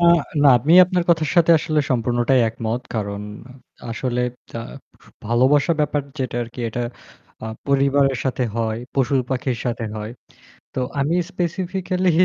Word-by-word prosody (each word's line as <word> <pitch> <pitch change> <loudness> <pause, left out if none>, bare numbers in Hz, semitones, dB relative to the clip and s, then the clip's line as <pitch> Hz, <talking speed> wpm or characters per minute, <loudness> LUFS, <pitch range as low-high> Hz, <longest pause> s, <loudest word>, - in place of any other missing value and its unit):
আ - - -1 0.4
না 145 - +7
আমি 145 +8 +1
আপনার 180 -1 0
কথার 160 -3 +2
সাথে 170 -1 +5
আসলে 155 0 0
সম্পূর্ণটাই 120 +1 +2
একমত। 115 +2 -3
কারণ 100 -2 -3 0.7
আসলে 125 +1 -2 0.4
আ - - -4 0.7
ভালোবাসার 135 +8 +3
ব্যাপার 145 -1 0 0.2
যেটা 130 -2 -3
আরকি 120 +1 -9
এটা 120 +2 -4 0.6
আ - - -4 0.2
পরিবারের 140 -1 +3
সাথে 130 -1 -1
হয়, 110 -1 -1 0.2
পশুপাখির 130 -2 0
সাথে 115 -1 -2
হয়। 105 +1 -5 0.6
তো 130 - -1 0.2
আমি 145 +5 +1 0.2
স্পেসিফিকালি 185 +1 -1
130 Hz, 130 wpm, -21 LUFS, 120-155 Hz, 0.7 s, না